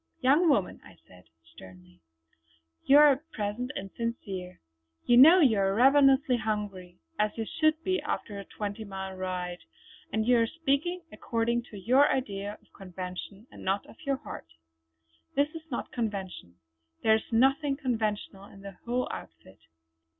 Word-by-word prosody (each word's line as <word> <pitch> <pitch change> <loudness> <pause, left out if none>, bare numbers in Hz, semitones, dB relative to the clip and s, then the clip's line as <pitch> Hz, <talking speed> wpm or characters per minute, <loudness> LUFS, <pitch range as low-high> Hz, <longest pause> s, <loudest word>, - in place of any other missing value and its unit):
"Young 290 +7 +4
woman" 205 -10 +1
I - - -16
said 90 -1 -18 0.2
sternly 90 +1 -16 0.8
"you 280 - +7
are 295 0 +8
at 300 +5 -4
present 215 +4 -3
insincere. 195 -3 -5 0.5
You 240 - +5
know 325 +8 +9
you 230 -9 +4
are 195 0 +1
ravenously 270 +1 +5
hungry, 205 -5 -4 0.2
as 210 +1 0
you 225 - -2
should 310 +2 +1
be 370 0 0
after 205 -2 -4
a - - -7
twenty 205 +1 -6
mile 190 -2 -6
ride; 180 -1 -4 0.5
and 220 0 0
you 245 0 +4
are 230 - +2
speaking 330 +5 -1
according 235 +1 -1
to 210 - -10
your 255 +9 +4
idea 205 -5 -3
of - - -31
convention 185 +2 -8
and - - -12
not 195 +1 -1
out - - -14
of - - -19
your 275 -2 0
heart. 270 - -9 0.9
This 285 +1 +2
is 325 -1 -10
not 240 - -5
convention; 195 - -5 0.5
there 220 - +5
is 220 - -1
nothing 270 +4 +2
conventional 215 -7 -3
in 195 - -15
the 200 0 -8
whole 245 +1 -1
outfit. - - -11
220 Hz, 155 wpm, -28 LUFS, 195-270 Hz, 0.9 s, know